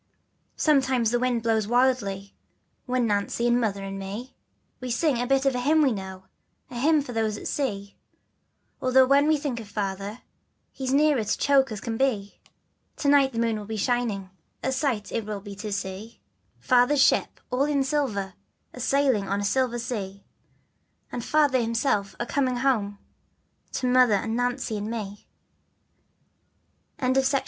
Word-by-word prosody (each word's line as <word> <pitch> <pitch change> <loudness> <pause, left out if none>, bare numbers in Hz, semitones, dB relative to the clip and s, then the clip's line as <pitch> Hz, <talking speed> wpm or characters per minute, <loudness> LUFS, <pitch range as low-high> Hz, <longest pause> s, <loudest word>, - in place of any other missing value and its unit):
Sometimes 265 -6 +2
the 240 - +1
wind 245 -2 0
blows 220 -2 +1
wildly, 225 -6 +1 0.5
But 250 0 +1
Nancy, 210 +2 0
and 240 0 +3
Mother, 200 -3 -1
and 195 0 -5
me, 205 +7 -7 0.4
We 255 - -6
sing 250 +1 +1
a 245 - -2
bit 270 +1 +2
of 270 - +3
a 250 - -1
hymn 305 +5 +3
we 270 - +3
know, 190 -3 -6 0.5
The 245 - -6
hymn 300 +2 +3
for 250 - -8
those 220 -2 -1
at - - -6
sea, 200 -8 -3 0.9
Although 260 0 +5
when 280 +2 +4
we 310 0 +4
think 275 -5 -3
of 220 - -9
Father, 200 +2 -4 0.6
We're 265 - -3
as 255 - -1
near 295 +2 +4
to 210 - -1
choke 270 -3 +3
as 215 - -4
can 225 +1 -4
be. 220 -7 -1 0.6
To 285 - 0
night 275 -2 +4
the - - -6
moon 230 -2 0
will 205 - -9
be 220 0 -4
shining, 215 -4 -1 0.3
A 265 - 0
sight 260 -6 -1
it 230 - -2
will 210 -1 -4
be 200 0 -9
to 210 0 -5
see, 200 +3 -5 0.4
Father's 255 +3 +3
ship - - +2
all 255 +3 +2
in 290 -2 +1
silver, 255 -9 -1 0.4
A'sail 250 -5 +1
on 200 +1 0
a - - -2
silver 250 +2 +1
sea, 205 -5 -5 0.9
And 240 - -4
Father 290 -3 +3
himself 225 -4 0
a 240 - -1
coming 255 0 0
ho 225 -6 0 0.8
To - - -2
Mother 250 -3 +5
and 225 +3 -2
Nancy 245 -2 -1
and 210 +1 -4
me. 205 -3 -6 1.7
FATHER'S 265 +1 +2
BOAT. 275 - +4
240 Hz, 170 wpm, -25 LUFS, 205-265 Hz, 1.7 s, Although